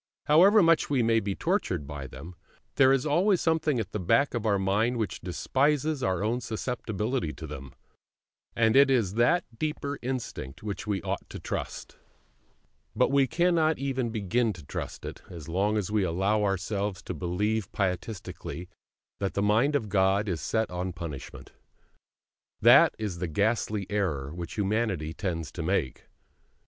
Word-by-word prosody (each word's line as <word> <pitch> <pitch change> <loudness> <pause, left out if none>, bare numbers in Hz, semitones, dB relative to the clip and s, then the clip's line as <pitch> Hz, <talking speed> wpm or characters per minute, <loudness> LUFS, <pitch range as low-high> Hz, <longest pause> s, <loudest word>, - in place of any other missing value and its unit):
However 190 +7 +6
much 165 -1 +3
we 135 -4 +2
may 115 0 +3
be 100 -3 -3
tortured 75 - -1
by 70 -1 -6
them, 70 +8 -10 0.4
there 135 -1 +5
is 135 0 +2
always 180 +6 +3
something 160 -5 +1
at 105 -3 -4
the 105 - -3
back 140 +10 +2
of 115 -2 -2
our 100 -2 +3
mind 105 +6 +1
which 110 -5 -3
despises 140 - 0
our 95 -3 0
own 120 +4 0
susceptibility 115 - -2
to 80 - -8
them; 70 -3 -8 0.8
and 110 0 +3
it 140 0 +7
is 115 -8 +2
that 155 +10 +3
deeper 150 -2 -3
instinct 120 - -5
which 105 0 -5
we 100 -3 -1
ought - - -4
to - - -7
trust. - - -5 1.0
But - - +3
we 140 -1 +4
cannot 165 +1 +2
even 130 -3 -1
begin 110 +1 0
to 85 -4 -12
trust - - -6
it, - - -7
as 85 -4 -9
long 100 +5 +1
as 105 -1 -2
we 105 -1 +2
allow 95 +5 +1
ourselves 100 0 -2
to - - -5
believe 105 +4 -1
pietistically 90 -2 -4 0.5
that 100 -1 -2
the 100 - +1
Mind 115 +8 +3
of 115 -7 0
God 95 +1 +2
is 90 -5 -2
set 110 -3 -1
on 90 +1 -3
punishment. 80 -6 -8 1.1
That - - +7
is 105 -6 -4
the 90 - -2
ghastly 105 +3 0
error 80 -9 -2
which 85 0 -6
humanity 100 -6 -1
tends 85 -6 -3
to 85 - -6
make. 80 -6 -1
105 Hz, 160 wpm, -28 LUFS, 90-130 Hz, 1.1 s, it